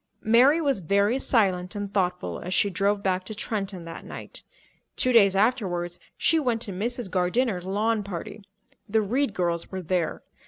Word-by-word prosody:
Mary 250 +8 +5
was 280 -8 +1
very 200 - +2
silent 190 -7 +1
and 205 -1 -5
thoughtful 180 -2 -1
as 180 +2 -3
she 200 - +3
drove 200 +3 0
back 185 -1 0
to 215 +3 -8
Trenton 195 -5 -4
that 165 0 -8
night. - - -8 0.5
Two 255 - +1
days 200 -5 +5
afterwards, 190 -6 0 0.2
she 325 - +3
went 240 -5 0
to 205 - -6
Mrs. 235 +4 -3
Gardiner's 185 +2 0
lawn 210 +3 0
party. 200 +2 -7 0.5
The 220 +1 +2
Reed 240 +2 0
girls 170 -2 -1
were 190 -1 -5
there. 175 -1 -1
200 Hz, 165 wpm, -26 LUFS, 180-230 Hz, 0.5 s, Mary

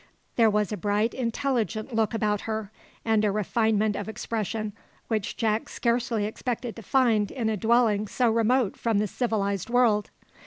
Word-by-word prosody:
There 225 -2 +5
was 210 -1 0
a 210 - -2
bright, 205 +4 0
intelligent 235 -3 -2
look 225 0 +1
about 210 -2 0
her, 220 -2 -3 0.3
and 220 -1 +2
a 210 - +3
refinement 215 +1 +1
of 205 +2 -4
expression 215 -1 -3 0.4
which 215 -4 -2
Jack 220 -1 0
scarcely 235 -2 0
expected 235 +2 -4
to - - -7
find 225 -3 +2
in 230 -4 -2
a 220 - 0
dwelling 220 -1 +2
so 240 +2 +1
remote 230 0 +2
from 230 -3 0
the 210 - +2
civilised 200 -3 -1
world. 235 -4 +3
220 Hz, 160 wpm, -26 LUFS, 210-235 Hz, 0.4 s, There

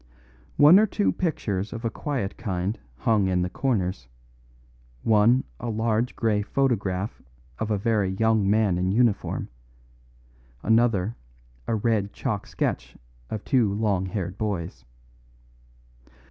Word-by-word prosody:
One 155 +7 +8
or 215 - +4
two 205 0 +1
pictures 105 - -2
of 115 +1 -6
a 115 - 0
quiet 130 -10 -3
kind 95 -1 -3 0.2
hung 105 - +2
in 90 -1 +1
the 90 - -3
corners, 95 - -1 1.0
one 115 +4 +4 0.2
a 120 - -4
large 110 +2 0
grey 110 -3 +1
photograph 105 -5 -1 0.4
of 110 - -2
a 105 - +1
very 105 -2 +1
young 110 +1 +2
man 105 -4 +2
in 90 +1 0
uniform, 115 0 +1 1.2
another 110 -2 +2 0.5
a 115 - +1
red 105 -2 0
chalk - - -3
sketch - - -3 0.3
of 110 - -4
two 120 -6 +2
long 100 -3 0
haired 90 -1 -4
boys. 85 - -3
105 Hz, 125 wpm, -25 LUFS, 95-115 Hz, 1.2 s, One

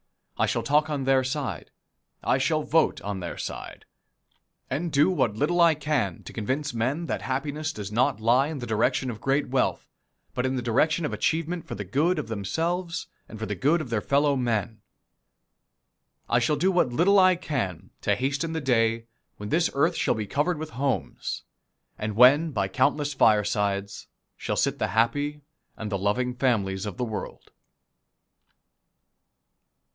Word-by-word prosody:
I - - +1
shall - - -1
talk 150 +2 +2
on 145 -3 -2
their 135 0 +3
side, 130 - -3 0.5
I 130 - +2
shall 155 +3 +1
vote 160 +1 +2
on 100 -1 -3
their 85 -2 -6
side, - - -7 0.9
and 170 +2 -2
do 150 +6 +4
what 130 - +1
little 170 +9 +1
I 165 -2 +6
can 145 - -1
to - - -10
convince 130 +6 -2
men 130 +9 -1
that - - -3
happiness 145 +4 -2
does 105 -7 -7
not 115 -1 +1
lie 120 +5 +3
in 155 -1 -5
the 125 - -5
direction 115 +3 +1
of 110 - -9
great 135 0 +1
wealth, 130 0 0 0.5
but 125 - -1
in 130 0 0
the 125 - -2
direction 150 +8 +2
of - - -3
achievement 165 +1 -1
for - - -5
the 100 - -5
good 150 - +1
of 115 - -4
themselves 165 - -2 0.2
and 110 - -9
for 110 - -4
the 105 - -3
good 145 - +2
of 135 -6 -6
their 110 -2 0
fellow 140 +3 +2
men. 115 -4 -1 1.5
I 120 - +3
shall 120 +5 +1
do 185 +6 +2
what 175 -9 +2
little 185 +10 +4
I 185 -1 +6
can 100 - -4
to 105 - +2
hasten 140 +7 -1
the 160 - -2
day 115 -3 +1 0.3
when 105 0 -6
this 165 +6 +2
earth 160 +5 +2
shall - - +1
be 110 -1 -3
covered 150 - 0
with 155 0 -6
homes, 135 0 -2 0.6
and 110 -1 -3
when 140 +8 +6
by 100 -9 -1
countless 145 +8 +1
firesides 105 -4 +1 0.3
shall - - -3
sit - - +1
the - - +1
happy 145 +8 0 0.4
and 110 -1 -5
the 100 - -1
loving 125 +6 0
families 105 -7 0
of 100 - -6
the 125 - -1
world. 110 -3 -7
130 Hz, 170 wpm, -26 LUFS, 110-155 Hz, 1.5 s, I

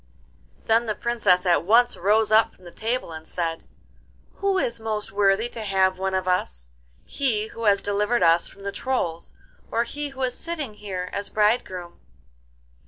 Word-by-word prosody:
Then 225 +1 +3
the 215 - -1
Princess 205 -7 +2
at 175 -4 +3
once 235 +6 +4
rose 215 +4 +2
up 220 +1 +4
from 185 - -23
the 175 - -10
table, 230 -2 -3
and 160 0 -9
said, 165 -2 -3 0.7
'Who 395 -1 +1
is 235 -10 -1
most 215 -1 -3
worthy 200 +2 +2
to 230 - -7
have 190 -2 +1
one 190 0 -1
of 185 0 -1
us—he 60 - -2
who 230 0 -6
has 200 -1 +4
delivered 210 +4 +1
us 165 +1 +4
from 200 - -15
the 200 - -3
Trolls 185 -10 -3 0.3
or 230 - +1
he 290 +5 -5
who 265 -1 -5
is 250 -1 0
sitting 310 -9 -5
here 190 -3 -5
as 200 0 -4
bridegroom? 210 -5 0
205 Hz, 170 wpm, -24 LUFS, 180-230 Hz, 0.7 s, once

